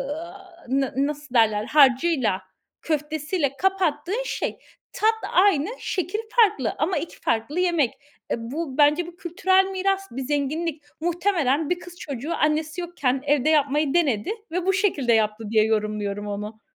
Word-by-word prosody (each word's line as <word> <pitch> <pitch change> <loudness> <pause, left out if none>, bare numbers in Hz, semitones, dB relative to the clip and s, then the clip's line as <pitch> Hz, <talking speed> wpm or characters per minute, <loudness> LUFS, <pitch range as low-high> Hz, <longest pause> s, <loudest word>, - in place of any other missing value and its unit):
aaa, 340 +2 -11
na 270 0 0
nasıl 285 -1 -2
derler 215 -2 +3
harcıyla, 265 - +3 0.4
köftesiyle 300 -1 -2
kapattığın 380 +3 0
şey. - - -3 0.3
Tat 440 +1 +3 0.2
aynı, 370 -3 +4
şekil 370 +3 -2 0.2
farklı 405 - +3
ama 335 +5 0
iki 335 - -6
farklı 235 +9 -1
yemek. 335 -9 +2 0.4
E, - - +3 0.2
bu 295 -3 -4
bence 300 +3 +4
bu 345 - -11
kültürel 375 +2 +2
miras, 390 0 -1
bir 265 +3 -5
zenginlik. 295 +3 -2 0.2
Muhtemelen 335 -4 +1
bir 355 0 0
kız 355 0 -12
çocuğu 280 +2 -4
annesi 310 +3 0
yokken 275 -7 -1
evde 290 0 +2
yapmayı 295 -1 +2
denedi 310 - +1 0.2
ve 360 +1 -2
bu 385 - +3
şekilde 340 - +2
yaptı 220 0 +1
diye 220 -1 +4
yorumluyorum 210 -2 -1
onu. 210 +2 -6
300 Hz, 145 wpm, -24 LUFS, 260-350 Hz, 0.4 s, aynı